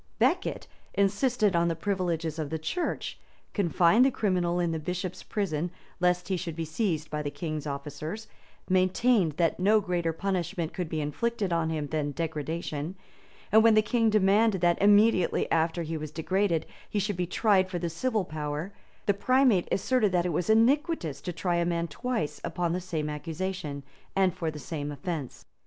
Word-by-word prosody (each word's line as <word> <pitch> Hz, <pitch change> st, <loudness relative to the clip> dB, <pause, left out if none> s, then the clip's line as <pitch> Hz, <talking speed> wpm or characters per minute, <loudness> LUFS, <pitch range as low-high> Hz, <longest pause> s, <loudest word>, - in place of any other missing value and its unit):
Becket -, -, +1 dB, 0.3 s
insisted 205 Hz, +1 st, +2 dB
on 170 Hz, 0 st, +3 dB
the 165 Hz, -, 0 dB
privileges 165 Hz, -3 st, -2 dB
of 150 Hz, -2 st, -2 dB
the 160 Hz, -, -2 dB
church; 330 Hz, -, -3 dB, 0.3 s
confined 180 Hz, +3 st, +4 dB
the 270 Hz, -, +5 dB
criminal 180 Hz, -7 st, 0 dB
in 170 Hz, -1 st, +1 dB
the 160 Hz, -, -2 dB
bishop's 180 Hz, +3 st, -4 dB
prison, 175 Hz, -5 st, -2 dB, 0.3 s
lest 180 Hz, 0 st, +2 dB
he 190 Hz, -1 st, 0 dB
should 170 Hz, -2 st, -5 dB
be 165 Hz, 0 st, -3 dB
seized 160 Hz, -2 st, -2 dB
by 150 Hz, 0 st, -2 dB
the 145 Hz, -, -2 dB
king's 155 Hz, -1 st, -4 dB
officers; 150 Hz, +9 st, -5 dB, 0.4 s
maintained 185 Hz, 0 st, +3 dB
that 165 Hz, +2 st, +1 dB
no 210 Hz, +4 st, +5 dB
greater 175 Hz, -4 st, -1 dB
punishment 180 Hz, -1 st, -2 dB
could 180 Hz, -4 st, -3 dB
be 160 Hz, -2 st, -2 dB
inflicted 200 Hz, +6 st, -1 dB
on 165 Hz, -1 st, +1 dB
him 155 Hz, -2 st, -2 dB
than 145 Hz, -1 st, -2 dB
degradation; 160 Hz, +1 st, -3 dB, 0.6 s
and 220 Hz, +2 st, +7 dB
when 225 Hz, -1 st, +6 dB
the 215 Hz, -, +5 dB
king 225 Hz, +1 st, +2 dB
demanded 210 Hz, 0 st, +3 dB
that, 175 Hz, 0 st, +2 dB
immediately 205 Hz, -2 st, +4 dB
after 165 Hz, +1 st, +1 dB
he 160 Hz, 0 st, -3 dB
was 155 Hz, 0 st, -5 dB
degraded, 170 Hz, +1 st, 0 dB, 0.2 s
he -, -, -3 dB
should 205 Hz, 0 st, 0 dB
be 180 Hz, 0 st, -1 dB
tried 190 Hz, -1 st, +2 dB
by 180 Hz, -, -1 dB
the 175 Hz, 0 st, -2 dB
civil 215 Hz, +5 st, -1 dB
power, 150 Hz, +4 st, -4 dB, 0.3 s
the 200 Hz, -, +3 dB
primate 250 Hz, -2 st, +3 dB
asserted 215 Hz, 0 st, +2 dB
that 175 Hz, -1 st, +2 dB
it -, -, +1 dB
was 170 Hz, +4 st, -1 dB
iniquitous 230 Hz, -, +2 dB
to 180 Hz, -, -4 dB
try 175 Hz, +1 st, -1 dB
a 170 Hz, -, +2 dB
man 170 Hz, 0 st, 0 dB
twice 235 Hz, -, -3 dB
upon 170 Hz, -1 st, -1 dB
the 180 Hz, -, -2 dB
same 165 Hz, -4 st, -3 dB
accusation, 160 Hz, -1 st, -4 dB, 0.3 s
and 190 Hz, -2 st, +3 dB
for 165 Hz, -, -2 dB
the 155 Hz, -, -7 dB
same 150 Hz, -1 st, -5 dB
offence. 145 Hz, -2 st, -5 dB
175 Hz, 180 wpm, -28 LUFS, 160-200 Hz, 0.6 s, and